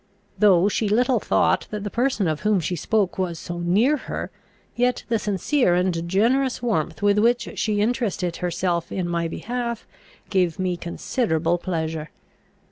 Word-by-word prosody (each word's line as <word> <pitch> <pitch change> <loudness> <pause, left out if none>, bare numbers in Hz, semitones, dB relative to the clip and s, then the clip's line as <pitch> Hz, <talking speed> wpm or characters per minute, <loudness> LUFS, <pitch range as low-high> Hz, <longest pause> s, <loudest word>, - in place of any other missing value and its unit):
Though 195 -3 +5
she 210 +1 0
little 245 +3 +3
thought - - +1
that 210 -1 -5
the 205 - -4
person 240 -6 +1
of 155 -1 -1
whom 210 -2 +2
she 175 +2 -2
spoke 200 +3 0
was 175 -3 -1
so 175 +1 -6
near 210 +12 +3
her, - - -5 0.4
yet 245 +1 +1
the 230 -1 +1
sincere 205 - +1
and 175 -2 0
generous 250 +8 +2
warmth 210 -6 -2
with 205 0 +4
which 235 +2 +2
She 210 -2 +1
interested 210 -6 -1
herself 175 -1 -1
in 185 -2 -2
my 170 -1 -1
behalf 235 +5 -4 0.5
gave 180 -5 +1
me 185 -1 -1
considerable 175 -1 -1
pleasure. 160 -3 -3
195 Hz, 155 wpm, -23 LUFS, 175-230 Hz, 0.5 s, Though